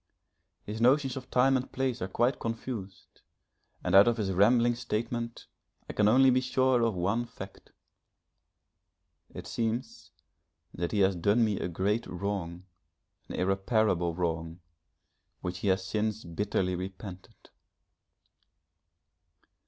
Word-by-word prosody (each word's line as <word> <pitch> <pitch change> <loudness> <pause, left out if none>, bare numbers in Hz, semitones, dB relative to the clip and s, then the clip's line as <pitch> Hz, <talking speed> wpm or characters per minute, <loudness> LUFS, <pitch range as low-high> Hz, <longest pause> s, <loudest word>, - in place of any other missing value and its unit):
His 110 +2 -6
notions 135 +1 +3
of 130 -1 -8
time 135 +2 +4
and 130 0 -2
place 130 -2 -2
are 95 - -1
quite 120 +6 +1
confused, 115 -4 -6 0.6
and 90 - -1
out 100 +3 +8
of 120 0 +2
his 100 -3 -1
rambling 115 +6 +4
statement 115 0 -4 0.4
I - - -6
can 105 - +3
only 130 +4 +6
be 130 +1 +3
sure 130 -1 +2
of 115 -3 +1
one 100 +7 0
fact. 95 -4 -11 1.6
It - - -8
seems 115 +2 -3 0.6
that 85 0 -3
he 105 - +1
has 95 0 +3
done 100 +7 +3
me 105 -3 -1
a - - -2
great 100 +6 -1
wrong, 90 -2 -4 0.6
an - - -5
irreparable 95 -2 +1
wrong, 85 -1 -3 0.8
which 90 0 -4
he 100 - -3
has 95 0 +2
since 110 +2 -2
bitterly 95 +1 -1
repented. 95 0 -8
105 Hz, 130 wpm, -29 LUFS, 95-120 Hz, 1.6 s, out